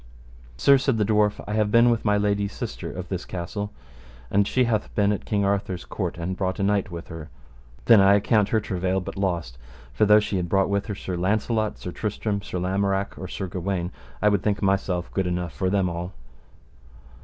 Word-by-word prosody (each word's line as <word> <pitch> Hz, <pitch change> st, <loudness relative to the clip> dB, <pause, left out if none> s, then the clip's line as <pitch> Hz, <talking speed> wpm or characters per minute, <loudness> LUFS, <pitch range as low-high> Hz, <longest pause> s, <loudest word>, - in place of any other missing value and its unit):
Sir, 140 Hz, -, +5 dB
said 130 Hz, -3 st, +1 dB
the 105 Hz, -, +2 dB
dwarf, 105 Hz, 0 st, +2 dB
I 105 Hz, -, -3 dB
have 105 Hz, -1 st, +2 dB
been 115 Hz, +2 st, +5 dB
with 115 Hz, -, 0 dB
my 105 Hz, -1 st, +3 dB
lady's 100 Hz, -1 st, 0 dB
sister -, -, -5 dB
of -, -, -6 dB
this -, -, -3 dB
castle, 100 Hz, +3 st, -5 dB, 0.6 s
and 100 Hz, 0 st, +3 dB
she 130 Hz, -, +2 dB
hath 115 Hz, -3 st, 0 dB
been 100 Hz, -1 st, +3 dB
at 105 Hz, -, -3 dB
King 100 Hz, -2 st, 0 dB
Arthur's 100 Hz, -2 st, -1 dB
court, -, -, -4 dB
and 90 Hz, +2 st, -3 dB
brought 95 Hz, -1 st, -2 dB
a -, -, 0 dB
knight 100 Hz, -1 st, +1 dB
with 85 Hz, -2 st, -8 dB
her. 80 Hz, -1 st, -8 dB, 0.6 s
Then 115 Hz, -4 st, +7 dB
I 100 Hz, +1 st, +6 dB
account 105 Hz, 0 st, +2 dB
her 110 Hz, -, +2 dB
travail 95 Hz, -2 st, -1 dB
but 90 Hz, -, -7 dB
lost; 85 Hz, -11 st, -2 dB, 0.3 s
for 105 Hz, -, +3 dB
though 105 Hz, +1 st, +7 dB
she 105 Hz, -2 st, -2 dB
had 90 Hz, -2 st, -2 dB
brought 95 Hz, +1 st, +2 dB
with 100 Hz, +1 st, 0 dB
her 105 Hz, -, -3 dB
Sir 95 Hz, -1 st, -5 dB
Launcelot, 110 Hz, +4 st, 0 dB
Sir 90 Hz, -, -6 dB
Tristram, 105 Hz, +1 st, -2 dB
Sir 95 Hz, -, -5 dB
Lamorak, 95 Hz, +2 st, 0 dB
or 95 Hz, -, -7 dB
Sir 95 Hz, -, -4 dB
Gawaine, 90 Hz, 0 st, -3 dB, 0.3 s
I 105 Hz, -, +6 dB
would 100 Hz, -2 st, +1 dB
think 105 Hz, -1 st, -1 dB
myself 95 Hz, -2 st, 0 dB
good 95 Hz, -2 st, 0 dB
enough 90 Hz, -3 st, -2 dB
for 95 Hz, +6 st, -1 dB
them 95 Hz, -1 st, +2 dB
all. 85 Hz, +1 st, -4 dB
100 Hz, 210 wpm, -24 LUFS, 90-105 Hz, 0.6 s, Then